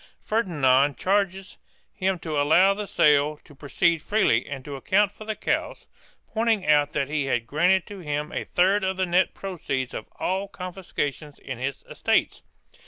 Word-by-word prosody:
Ferdinand 145 - +2
charges 195 -1 -1 0.3
him 190 -1 -1
to 155 -3 -2
allow 180 +7 +5
the 205 0 -5
sale 150 -5 +3
to - - -17
proceed 155 +4 0
freely 175 - +1
and 135 -2 -7
to 145 - -6
account 195 +9 +2
for 215 +1 -12
the 220 0 -3
cows, - - -2 0.5
pointing 225 -3 +1
out 150 -1 +3
that 140 -3 0
he 145 -1 -1
had 120 -4 -1
granted 175 +8 +2
to 205 -1 -9
him 150 -1 -3
a - - -3
third 190 +3 +2
of 190 0 -1
the 190 - +1
net 180 +1 +1
proceeds 140 -9 -4
of 110 - -6
all 190 +2 -2
confiscations 175 -6 -5
in 130 -3 -7
his 135 +1 -4
estates. - - 0
170 Hz, 170 wpm, -25 LUFS, 145-195 Hz, 0.5 s, allow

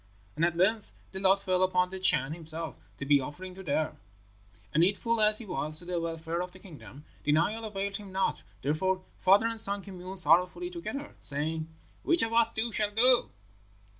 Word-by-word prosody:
And 155 - -2
at 170 0 +1
length 205 +4 0 0.2
the 190 - -6
lot 195 +1 +2
fell 185 -1 0
upon 180 -1 +1
the 190 - -7
Chan 155 -6 +1
himself 160 0 -6 0.2
to 140 - -6
be 145 0 +4
an 130 - -5
offering 180 +6 -9
to 190 - -11
them, 155 -2 -2 0.8
and 160 - +3
needful 215 +5 +1
as 210 0 +4
he 230 - -1
was 155 -4 -4
to 175 - -4
the 175 -1 -3
welfare 165 +1 -4
of 180 0 -6
the - - -14
kingdom, 155 -6 -14 0.2
denial 170 +10 0
availed 200 -1 -4
him 205 -2 -12
not; 190 0 -1 0.2
therefore 185 +7 -1 0.2
father 200 +4 +4
and 230 -1 +2
son 200 -2 +3
communed 185 0 -8
sorrowfully 180 - +2
together, 295 -4 -7
saying, 155 +3 +6 0.3
'Which 340 -1 +2
of 225 0 -3
us 230 0 +4
two 230 +1 -2
shall 210 -1 0
go?' 240 +4 +3
185 Hz, 195 wpm, -28 LUFS, 165-210 Hz, 0.8 s, saying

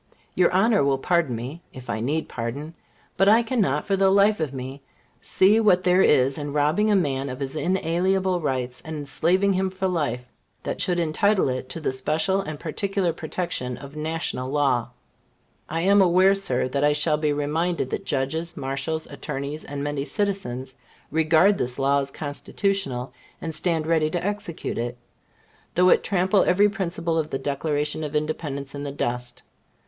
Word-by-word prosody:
Your 180 -1 +3
Honor 200 +1 +3
will 140 -1 +2
pardon 165 -3 +1
me, 130 +9 -6
(if 130 -1 -11
I 110 - -2
need 145 +8 -1
pardon,) 135 +7 -5 0.4
but 195 +1 +5
I 225 +3 +6
cannot, 210 - 0
for 195 - +1
the 195 0 +3
life 200 +2 +4
of 155 -4 -1
me, 135 +1 -7 0.4
see 205 +4 +4
what 185 -5 +4
there 180 +1 +4
is 135 -4 +3
in 145 -1 -4
robbing 150 +9 +2
a 210 - +4
man 140 -6 0
of 130 +1 -6
his 135 +1 -4
inalienable 185 +2 +1
rights 130 -4 -2
and 160 0 -6
enslaving 175 +7 +1
him 190 0 0
for 190 0 -2
life, 140 -9 -2 0.4
that - - -3
should 175 -1 +1
entitle 185 +2 +2
it 130 0 -4
to 165 - -5
the 155 - -1
special 155 +8 0
and 155 -6 -6
peculiar 190 +2 -1
protection 155 -7 -3
of 140 +2 -11
national 155 -4 -3
law. 135 -5 +1 0.8
I 165 +1 -1
am 200 +3 +5
aware, 185 +1 +5
Sir, 130 -11 0
that 140 +2 -1
I 150 0 +4
shall 150 +1 +2
be 150 -1 0
reminded 150 0 -1
that - - -3
judges, 160 +5 -2
marshals, 135 +4 -3
attorneys, 140 +1 -5
and 140 0 -5
many 145 -1 -2
citizens, 145 -6 -2 0.4
regard 160 +6 +4
this 125 0 -2
law 140 +1 +2
as 135 0 -3
Constitutional, 145 -2 -3 0.3
and 165 -1 -5
stand 160 0 0
ready 160 -1 +2
to 175 +2 -3
execute 205 - -3
it, 120 +1 -3 0.8
though 180 +1 +5
it - - +5
trample 190 +1 +2
every 200 +3 +4
principle 170 -5 -2
of 155 -1 -2
the 135 - -2
Declaration 145 +2 -2
of 150 0 -5
Independence 150 -2 -3
in 140 - -6
the 145 -1 -4
dust. 125 -2 -4
155 Hz, 175 wpm, -24 LUFS, 140-185 Hz, 0.8 s, I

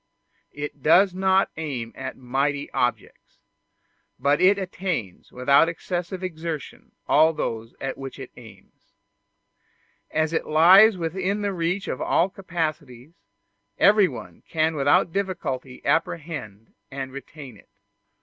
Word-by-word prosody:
It 145 -1 -6
does 180 +6 +5
not 190 +1 +2
aim 130 -8 -4
at 130 - -6
mighty 140 +3 -2
objects, 125 0 -3 0.8
but 145 +1 +1
it 195 +2 +5
attains 180 - -4
without 140 +6 +4
excessive 175 +2 -4
exertion 165 -4 -6
all 160 +2 +5
those 115 -6 -4
at 135 0 -5
which 135 -1 -7
it 130 -2 -9
aims. 115 -3 -17 1.2
As 155 +1 0
it 160 - -1
lies 185 +7 +7
within 190 +5 -2
the 200 -1 -1
reach 180 +3 -2
of - - -4
all 175 - +2
capacities, 155 -7 -5 0.6
everyone 190 - +2
can 160 0 +1
without 145 +3 +3
difficulty 150 -10 -4
apprehend 145 - -2 0.2
and 135 -1 -6
retain 140 -1 -10
it. - - -20
155 Hz, 120 wpm, -24 LUFS, 135-180 Hz, 1.2 s, lies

